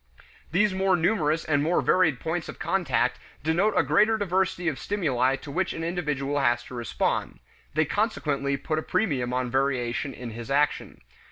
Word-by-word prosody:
These 195 +4 +3
more 190 0 +2
numerous 160 -3 +1
and 145 -2 +2
more 165 +4 +2
varied 160 -8 +3
points 160 +1 -3
of - - -8
contact - - 0 0.2
denote 175 +7 +2
a - - +5
greater 220 +1 +3
diversity 185 -3 0
of 145 -6 -1
stimuli 135 -10 +1
to 140 - -9
which 185 +5 -1
an 165 - -5
individual 150 -5 -1
has 120 -3 +2
to 125 - -12
respond; 120 -1 -2 0.4
they 155 +1 +3
consequently 145 - -1
put 155 +3 -2
a - - -3
premium 140 - 0
on 125 -1 -1
variation 130 0 0
in 125 -2 -7
his 115 +1 -8
action. 145 +1 0
150 Hz, 170 wpm, -26 LUFS, 135-180 Hz, 0.4 s, a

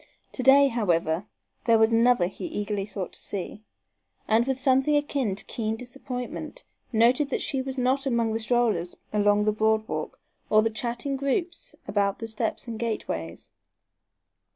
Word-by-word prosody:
To - - -4
day, 275 +2 +7
however, 180 -6 0 0.4
there 230 -1 +5
was 220 +1 +4
another 230 -4 +4
he 190 - -6
eagerly 205 - -3
sought 195 -3 -5
to - - -9
see, 200 +1 -5 0.7
and, 225 +3 +3
with 265 -1 -1
something 265 +3 +3
akin 275 -8 -1
to 200 - 0
keen 220 -1 -2
disappointment, 250 - -6 0.3
noted 245 +5 +3
that - - -1
she 270 - -1
was 265 0 -5
not 260 +2 +1
among 230 -3 +1
the 225 - -1
strollers 220 -6 +1 0.2
along 205 0 +3
the 215 - +2
board 220 +1 +1
walk - - -4 0.3
or 215 0 +5
the 225 - 0
chatting 240 +4 -3
groups 335 +6 -2
about 200 -1 +1
the 225 - -6
steps 220 0 -2
and 225 -2 -5
gateways. 85 - -4
230 Hz, 160 wpm, -26 LUFS, 210-260 Hz, 0.7 s, day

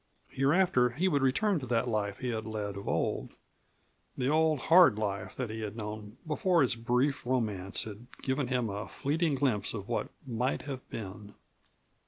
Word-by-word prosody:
Hereafter 135 -1 +3
he 175 +9 +1
would 145 -6 +2
return 175 +8 +2
to 130 - -7
that 120 +1 +1
life 105 -3 -1
that - - -18
he 125 - 0
had 110 -2 -3
led 105 -2 -3
of 100 - -7
old; - - -1 0.8
the 130 0 +1
old 155 -1 +3
hard 170 - +7
life 105 -1 -3
that 125 -4 -3
he 110 - -5
had 105 -1 -4
known 105 -1 -6
before 165 +1 +3
his 125 - +1
brief 125 +5 +1
romance 110 -7 0
had 110 +2 -9 0.2
given 130 0 0
him 125 -2 0
a 100 +1 -4
fleeting 155 +1 0
glimpse 125 -7 0
of 100 -2 -6
what - - -1 0.2
might 125 +1 -1
have 135 -3 -7
been. 105 0 -7
125 Hz, 180 wpm, -31 LUFS, 105-140 Hz, 0.8 s, hard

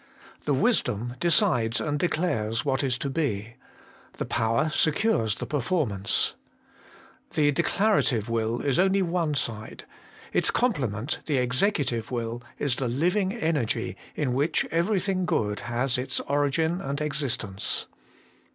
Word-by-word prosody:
The - - +2
Wisdom 120 +4 +1
decides 165 - +3
and 150 -1 -1
declares 115 -10 0
what 135 0 +1
is 130 -2 +1
to 140 - -3
be: 120 -7 -2 0.6
the - - -2
Power 115 +8 +1
secures 150 - +2
the - - -5
per 145 - -1
formance. 120 - 0 1.0
The 150 -2 +4
declarative 170 - +2
will 115 0 -1
is 140 0 +1
only 190 +1 +3
one 170 -4 0
side; 110 -5 -3 0.5
its - - +2
complement, 135 - 0
the 145 -4 +1
executive 125 - +1
will, 120 -1 -3 0.2
is 140 -4 0
the 130 - -1
living 180 - +1
energy 160 - -1 0.2
in 130 -5 0
which 145 +5 +1
everything 185 +1 +1
good 105 -7 0
has 120 +2 -1
its 125 - -2
origin 145 +5 +1
and 140 -5 -3
exist 150 -5 0
ence. 100 -2 -2
140 Hz, 135 wpm, -26 LUFS, 115-165 Hz, 1.0 s, The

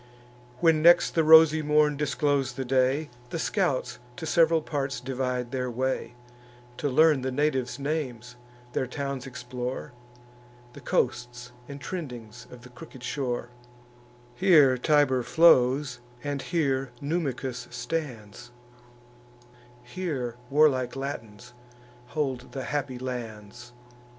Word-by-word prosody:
When 165 -2 +4
next 175 +2 +6
the 165 - +2
rosy 160 0 +7
morn 150 0 +3
disclos'd 140 -2 0
the 130 - -3
day, 130 +4 +1 0.2
The 165 - -4
scouts 135 - -1 0.2
to 160 - -6
sev'ral 165 -1 +3
parts 135 -4 -3
divide 125 -1 -3
their 125 -1 -2
way, 125 -1 -2 0.6
To 145 - -1
learn 150 +1 +4
the 130 - -2
natives' 130 -2 0
names, 130 -5 -4 0.4
their 130 - -1
towns 140 0 -4
explore, 125 -1 -6 0.8
The - - -12
coasts 125 0 -2 0.2
and 140 0 -7
trendings 125 -10 -7
of 125 -1 -13
the 125 - -12
crooked 125 +1 -13
shore: 125 -3 -3 0.8
Here 150 -5 +5
Tiber 130 -1 +2
flows, 130 -2 +4 0.2
and 145 -1 -3
here 135 -6 -1
Numicus 135 -5 -3
stands; 120 -5 -5 1.3
Here 130 -4 -4
warlike 135 -4 +3
Latins 120 -4 -7 0.5
hold 130 -3 -3
the 135 - -4
happy 140 -3 -3
lands. 120 -2 -7
130 Hz, 115 wpm, -27 LUFS, 125-150 Hz, 1.3 s, rosy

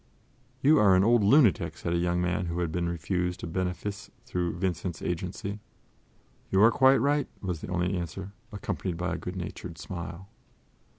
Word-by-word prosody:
"You 150 +3 +6
are 100 -3 +6
an 95 - +4
old 115 0 +4
lunatic," 110 - +4
said 85 - -2
a - - +2
young 90 0 +1
man 90 0 -1
who 85 +1 -2
had 85 -2 -1
been 85 +1 -1
refused 90 +2 -2
a - - -1
benefice 95 +4 -3 0.2
through 90 -8 -2
Vincent's 90 -2 -2
agency. 95 +4 -3 0.9
"You 95 +2 +4
are 115 - +7
quite 130 +2 +5
right," 145 +3 +2
was 90 -5 -4
the - - -6
only 90 +1 0
answer, 90 +3 -5 0.2
accompanied 95 -4 -3
by 90 +2 -2
a - - -2
good 90 - -6
natured 90 -2 -6
smile. 85 +2 -7
90 Hz, 175 wpm, -28 LUFS, 85-100 Hz, 0.9 s, are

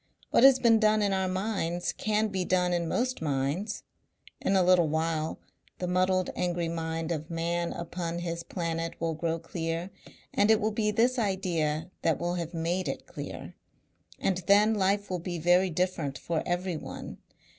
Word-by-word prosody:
What - - +5
has 270 -1 +9
been 230 -3 +5
done 215 -1 +3
in 200 -1 +1
our 190 -1 +1
minds 185 -3 -1
can 215 0 0
be 190 -2 -1
done 180 0 +1
in 170 -1 0
most 250 +6 -1
minds. 150 +8 -1 0.6
In 195 - +1
a 190 - +5
little 180 -2 +5
while 160 0 -1 0.4
the 180 - -3
muddled 185 +1 +1
angry 175 -1 -1
mind 165 0 -3
of 155 -1 -3
Man 170 +1 -1
upon 170 0 -4
his 170 -1 -3
Planet 165 -1 -3
will 165 0 -1
grow 165 +1 -1
clear 165 +2 -4 0.4
and 205 +1 +3
it 220 -1 +6
will 215 0 0
be 210 0 0
this 240 +4 +2
idea 175 -6 -1
that 165 - +2
will 175 0 -1
have 170 -2 -3
made 175 +2 -1
it - - -4
clear. - - -7 0.6
And 190 - 0
then 210 +2 +6
life 200 0 +1
will 180 - -1
be 175 0 -4
very 175 +3 +4
different 165 -5 -1
for 165 +4 -2
everyone. 175 -2 -4
175 Hz, 170 wpm, -29 LUFS, 165-195 Hz, 0.6 s, has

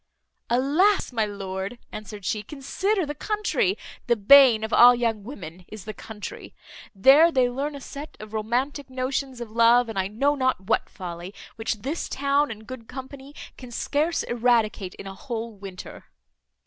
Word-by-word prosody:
"Alas! 295 - +2
my 220 -2 +1
lord," 195 +2 -5
answered 210 -2 -8
she, 215 - -1
"consider 340 - -2
the 295 - -4
country 420 - 0 0.3
the 240 - +4
bane 235 +1 +7
of 220 - -3
all 245 +1 +8
young 230 -4 -1
women 185 - -9
is 215 -3 -10
the 215 - -5
country. 210 0 -9 0.4
There 280 - +7
they 255 -4 +3
learn 280 +4 -3
a 280 - -8
set 290 +3 -9
of 215 0 -10
romantic 250 +6 -2
notions 260 0 -3
of 235 -3 -7
love, 235 +1 +4
and 210 -3 -3
I 190 - 0
know 275 +8 +1
not 260 -5 0
what 215 +3 0
folly, 175 +1 -8 0.2
which 220 -1 -3
this 295 +6 -3
town 280 +1 +1
and 220 -1 -8
good 235 -1 -9
company 270 +2 -9 0.2
can 250 - -10
scarce 295 +7 -1
eradicate 230 -5 +1
in - - -10
a 195 - -7
whole 230 +1 -5
winter." 195 -3 -10
240 Hz, 165 wpm, -25 LUFS, 215-280 Hz, 0.4 s, all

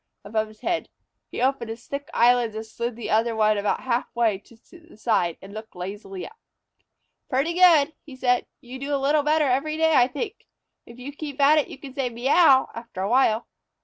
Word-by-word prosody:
above 215 +1 -1
his 215 0 -18
head, 345 -1 -2 0.4
he - - -6
opened 255 -2 0
his 225 +1 -8
thick 280 0 -6
eyelids 240 -2 +3
and 220 0 -5
slid 235 +2 -4
the 235 - -5
other 225 +1 +2
ones 215 -1 +2
about 205 - -1
half 245 -1 -1
way 225 -5 +1
to 230 - -20 0.2
one 335 - -17
side, 195 -7 0
and 195 +1 -11
looked 215 -1 -9
lazily 195 +1 -7
up. 455 +2 -13 0.9
"Pretty 275 +6 0
good!" 335 -4 +5
he 280 -4 -12
said. 250 -1 +1
"You 255 +2 -9
do 285 +1 -2
a - - +1
little 285 +2 +2
better 305 +1 +2
every 280 +4 0
day 320 0 +3
I 250 -4 +5
think. 405 - -6 0.4
If 235 - -13
you 255 +3 -7
keep 290 -1 -8
at 290 +2 +6
it 295 - -1
you - - -10
can 275 -2 -10
say 265 -2 -1
'Meouw' 265 +4 +4
after 230 -5 -8
a 195 - -1
while." 235 -3 +3
250 Hz, 210 wpm, -24 LUFS, 220-285 Hz, 0.9 s, at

